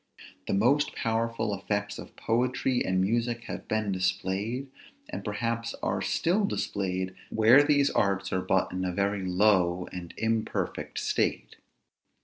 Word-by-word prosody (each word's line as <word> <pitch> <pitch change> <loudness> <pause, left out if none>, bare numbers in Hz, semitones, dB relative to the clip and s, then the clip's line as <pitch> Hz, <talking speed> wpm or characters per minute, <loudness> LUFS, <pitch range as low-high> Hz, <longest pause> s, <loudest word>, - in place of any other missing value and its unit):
The - - +1
most 130 +9 +2
powerful 115 -1 -1
effects 105 +1 -2
of - - -10
poetry 125 +2 0
and 95 0 +1
music 115 +4 0
have - - -7
been 110 -2 0
displayed, 95 +7 -1 0.4
and - - -6
perhaps 115 +2 -2
are - - 0
still 185 +6 +1
displayed, 95 - -2 0.2
where 115 +5 +6
these 145 -1 +3
arts 100 -2 0
are 95 - +1
but 95 0 +1
in 95 0 -3
a 90 - -1
very 100 +2 0
low 90 -2 +2
and 90 -2 -7
imperfect 110 0 -2
state. - - -1
105 Hz, 135 wpm, -28 LUFS, 95-115 Hz, 0.4 s, where